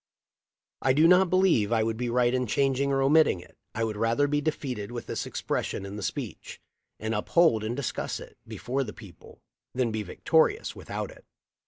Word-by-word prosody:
I 130 - +3
do 155 +4 +5
not 180 +1 +5
believe 175 - +3
I 115 -2 +3
would 110 0 -1
be 120 0 -2
right 120 0 +2
in 125 -1 0
changing 135 +3 +1
or 135 0 +2
omitting 150 - +4
it. - - -16 0.2
I 115 - 0
would 110 -2 -2
rather 115 +6 +2
be 145 +1 0
defeated 130 -8 -3
with 120 -1 -6
this - - -4
expression 100 - -3
in 100 +1 -7
the 105 - -6
speech, - - -5 0.4
and 110 +1 -2
uphold 110 +2 +3
and 110 +2 -2
discuss 140 - -3
it - - -12
before 135 +3 -2
the 105 - -7
people, 95 -7 -15 0.3
than 125 -3 +1
be 110 0 -2
victorious 160 - +1
without - - -5
it." - - -16
125 Hz, 190 wpm, -27 LUFS, 110-145 Hz, 0.4 s, do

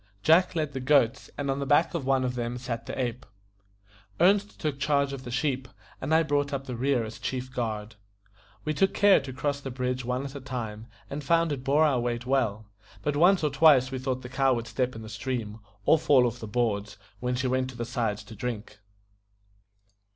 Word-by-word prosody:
Jack 175 +3 +4
led 155 -3 -1
the 135 - -3
goats, 130 -2 +2
and 140 -1 -1
on 135 - -2
the 140 - -2
back 150 +4 +3
of 155 -6 -3
one 135 -1 +3
of 125 -1 -1
them 120 0 -3
sat 115 -2 -5
the - - -5
ape. 125 -1 -2 1.0
Ernest 200 +4 +3
took 145 -3 -2
charge 140 -1 +1
of 135 -1 -6
the - - -6
sheep, 130 0 -1 0.3
and 135 - -3
I 160 +1 +5
brought 145 -1 0
up 135 -1 -3
the 125 - -5
rear 130 0 +1
as 110 0 -9
chief 130 +1 -4
guard. 110 -3 -3 0.7
We 155 - 0
took 195 +6 +1
care 200 -1 +6
to 135 -2 -7
cross 140 +2 -2
the 135 - -5
bridge 125 0 -2
one 125 +2 -2
at 135 - -7
a 140 - -7
time, 115 -4 -5 0.2
and 145 +1 -5
found 165 +2 +2
it 135 -3 -3
bore 145 +4 +4
our 140 -5 +2
weight 120 0 -2
well; 115 -5 0 0.4
but 145 -1 0
once 175 +4 +4
or 150 - +2
twice 140 -3 +5
we 130 - -3
thought 130 0 -3
the - - -6
cow 135 0 +2
would 115 -1 -3
step 125 0 -2
in 110 - -7
the - - -8
stream, 115 -2 -4 0.3
or 160 - +5
fall 135 -5 +5
off 120 0 -2
the 110 - -7
boards, 105 -3 -1 0.2
when 125 0 -1
she 130 +1 -2
went 130 0 0
to 130 - -10
the 120 - -3
sides 115 -4 -2
to 110 - -12
drink. 105 -2 -5
130 Hz, 220 wpm, -27 LUFS, 120-145 Hz, 1.0 s, care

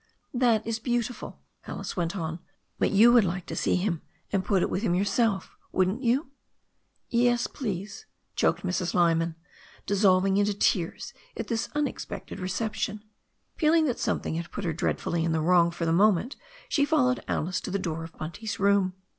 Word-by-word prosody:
"That 240 -4 +2
is 225 0 -2
beautiful," 240 0 -3 0.2
Alice - - -5
went 175 +1 -1
on, 165 -1 -3 0.4
"but - - +3
you 225 +4 +6
would 240 -3 +7
like 180 -1 -2
to - - -6
see - - +1
him, 180 -3 -1 0.3
and 195 -2 +2
put 190 -2 +2
it - - 0
with 190 - -1
him 185 -6 +1
yourself, 200 +1 0 0.2
wouldn't 190 +6 +1
you?" 260 +3 +1 0.8
"Yes, 240 0 +3
please," 200 - -5 0.3
choked - - +1
Mrs. 180 -1 -1
Lyman, 165 -1 +2 0.5
dissolving 195 -1 +3
into 205 0 +2
tears 205 +5 0 0.2
at 210 - -4
this 225 -1 -1
unexpected 295 -1 -3
reception. 210 +2 -2 0.5
Feeling 320 0 +4
that 250 -5 -1
something 210 -7 -1
had 170 +1 -4
put 205 - -6
her 165 - 0
dreadfully 170 +1 -1
in 165 -1 0
the 160 - +1
wrong 170 +1 +4
for 170 0 -4
the 165 - +2
moment, 210 - +3 0.3
she 285 - +2
fol 290 -3 +3
lowed 255 0 0
Alice 175 +3 -1
to - - -5
the 200 - 0
door 165 -4 -3
of 165 - -11
Bunt/s 200 +8 -5
room. 200 -2 +3
200 Hz, 175 wpm, -27 LUFS, 175-235 Hz, 0.8 s, would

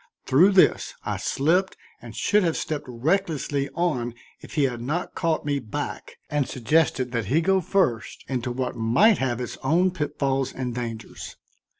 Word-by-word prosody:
Through 180 +10 +5
this 190 - +3
I - - -2
slipped 175 +7 +1 0.2
and 115 -3 -10
should 210 - +2
have 170 -4 0
stepped 155 -2 -3
recklessly 145 +1 -1
on 125 -9 -1 0.2
if - - -12
he 150 - +3
had 125 -3 -1
not 150 +9 -3
caught 165 -3 -1
me 145 -1 0
back 110 -5 -6
and 145 -4 -1
suggested 130 0 +1
that 115 -3 -1
he 140 +11 +2
go 190 +3 +2
first 155 - 0
into 125 -2 -2
what 125 0 -3
might 125 - +4
have 125 -3 -1
its 125 - -5
own 175 +7 +2
pitfalls 135 -5 -1
and 125 -2 -4
dangers. 115 -3 -6
140 Hz, 165 wpm, -25 LUFS, 120-165 Hz, 0.2 s, Through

